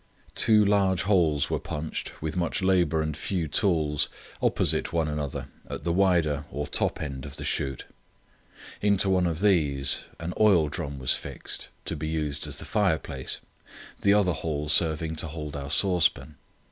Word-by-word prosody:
Two 105 -2 +6
large 100 -3 +2
holes 85 -7 +2
were - - 0
punched, 75 0 -5
with 80 -1 -3
much 90 +2 -1
labour 85 -4 +2
and 75 -1 -3
few 85 +1 -2
tools, 75 -3 +1 0.3
opposite - - +1
one 80 -2 0
another 75 -2 -4 0.2
at - - -6
the 85 - 0
wider 85 -6 +2
or 75 +3 -4
top - - 0
end 70 -4 -5
of 70 +1 -8
the 75 - -7
shoot. 70 -2 -2 1.0
Into 100 -1 +3
one 90 -1 +3
of 85 0 -3
these 75 -9 +2
an 85 +2 -4
oil 95 -8 +5
drum 70 -3 -4
was 65 -1 +2
fixed, - - -6 0.2
to - - -2
be 75 +1 -4
used 75 -2 -2
as - - -5
the - - -6
fireplace, 95 -8 -1 0.6
the 100 0 +4
other 95 -4 +3
hole 75 -1 -3
serving 80 0 +2
to 80 - -5
hold 75 -2 -6
our 70 0 -5
saucepan. 85 -2 +2
80 Hz, 165 wpm, -27 LUFS, 75-95 Hz, 1.0 s, Two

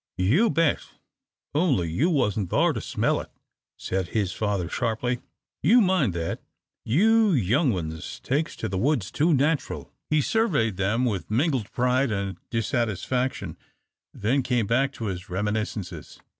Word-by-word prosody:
"You 140 - +3
bet, 165 0 +2 0.7
only 145 - +2
you 140 - +2
wasn't 105 - 0
thar - - +3
to - - -4
smell - - 0
it," - - -12 0.5
said 95 -1 -2
his 100 -1 -1
father, 100 -5 -1
sharply, 120 +4 -1 0.4
"you 225 +11 +6
mind 185 - +2
that. 85 -1 -3 0.4
You 215 - +4
young 130 - +2
ones 80 -5 -5
takes 150 +5 -1
to 110 - -4
the 95 -2 -2
woods 125 -4 0
too 160 +4 +2
natural." 145 +1 0 0.2
He 155 - +3
surveyed 140 - +1
them 105 +6 +1
with 100 -9 -2
mingled 125 - 0
pride 125 +2 +1
and 100 -3 -3
dissatisfaction, 120 +2 -1 0.5
then 120 +7 0
came 125 -3 0
back 130 +6 +1
to 115 - -6
his 95 -1 -5
reminiscences. 105 -3 -3
120 Hz, 145 wpm, -25 LUFS, 100-145 Hz, 0.7 s, you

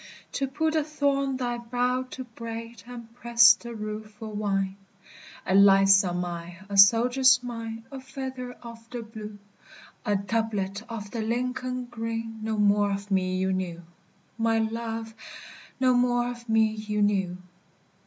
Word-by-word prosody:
To 275 - -1
pull 315 +4 0
the 315 -1 +1
thorn 280 -3 0
thy 240 -2 -2
brow 245 +2 0
to 260 - -6
braid, 230 -1 -8
And 235 -2 -10
press 235 -1 +6
the 235 -1 -9
rue 215 0 -5
for 215 +1 -10
wine! 195 -2 -1 0.7
A - - 0
lightsome 195 -2 +5
eye, 170 0 -6
a 200 - -5
soldier's 245 +5 +6
mien, 230 -2 -6
A 270 - -6
feather 260 -1 -6
of 230 -1 -11
the 240 -2 -5
blue, 215 -2 -9 0.7
A 210 -3 +1
doublet 200 -1 -1
of 210 -3 -6
the 230 - -3
Lincoln 250 +2 -2
green 225 -1 -5
No 220 0 -2
more 205 0 +3
of 200 +1 -4
me 185 -1 +1
you 190 0 0
knew, 175 -2 -3 0.6
My 225 0 +2
love! 225 0 -3 0.7
No 255 -1 +4
more 245 0 +2
of 240 -1 -11
me 220 0 +5
you 210 -1 -2
knew. 190 -3 +1
225 Hz, 150 wpm, -27 LUFS, 205-245 Hz, 0.7 s, press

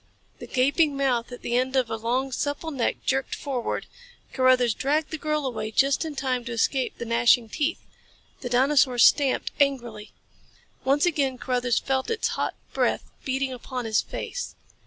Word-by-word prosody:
The - - -8
gaping 280 +3 +2
mouth 250 -4 0
at 245 - -9
the 240 - -1
end 260 +2 +1
of 260 -3 +2
a - - 0
long, 245 +4 -1
supple 290 +5 -3
neck 260 -5 -2
jerked 270 0 0
forward. 260 -4 -3 0.5
Carruthers 255 -3 +4
dragged 300 +6 0
the 315 - -3
girl 305 -1 -1
away 235 -4 -3
just 270 +7 +2
in 310 -2 -5
time 255 -3 -1
to 240 - -5
escape 250 +3 0
the 235 - -5
gnashing 235 0 +3
teeth. 305 +7 -2 0.5
The 245 - -5
dinosaur 260 0 +3
stamped 270 +3 +4
angrily. 240 -7 0 0.7
Once 280 +4 +3
again 280 -6 0
Carruthers 245 -1 0
felt 265 -1 -1
its 455 -1 0
hot - - -2 0.2
breath - - 0
beating 265 0 -1
upon 250 0 -5
his 220 -1 +2
face. - - -6
260 Hz, 165 wpm, -25 LUFS, 245-280 Hz, 0.7 s, Carruthers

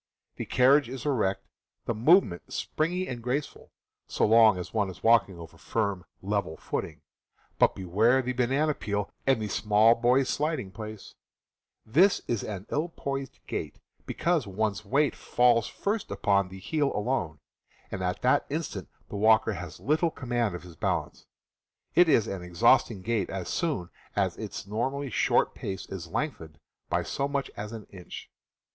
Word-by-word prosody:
The - - -4
carriage 135 +1 +4
is 130 +1 -7
erect, 100 -9 0 0.4
the - - 0
movement 115 - +3
springy 180 +4 -1
and 120 -2 -5
graceful, 130 +5 -4 0.4
so - - +1
long 110 -2 +6
as 90 - -7
one 105 -3 +1
is 95 - -11
walking 110 -5 +4
over 80 -1 -12
firm, 100 -5 -2 0.2
level 100 -5 -1
footing - - -4 0.3
— - - -38
but - - +4
beware 110 +8 +2
the 125 +1 -2
banana 135 +5 +1
peel 105 -5 -3 0.2
and 135 -3 +4
the 110 - -2
small 105 +2 +4
boy's 125 +3 +2
sliding 145 -7 -1
place! 110 0 -9 0.7
This 170 - +4
is 115 -4 -1
an 100 -2 -5
ill 155 +4 0
poised 135 -4 -5
gait, - - -4 0.3
because 170 -8 0
one's 105 +1 -1
weight 140 +7 +2
falls 120 -2 +2
first 205 +1 -3
upon 100 -2 +1
the 95 - -10
heel 140 +8 0
alone, 105 -8 -1 0.5
and 95 - -4
at 90 0 -2
that 125 - +3
instant 140 - -4 0.2
the - - -5
walker 110 +1 +4
has 85 -4 -7
little 155 +4 +1
command 120 - -2
of 90 - -8
his 90 -2 -12
balance. - - -2 0.7
It 175 -1 +5
is 115 -7 +4
an 100 -4 -5
exhausting 90 +2 +3
gait 105 -2 0
as 95 -2 -4
soon 145 - -2 0.2
as - - +1
its - - -6
normally 130 +6 -2
short - - +2
pace 95 -2 -5
is 90 -3 -6
lengthened 80 - -4 0.3
by - - +1
so 140 0 -2
much 140 -1 -2
as 105 +1 -6
an 110 -2 -8
inch. 90 -3 -10
115 Hz, 165 wpm, -28 LUFS, 95-135 Hz, 0.7 s, long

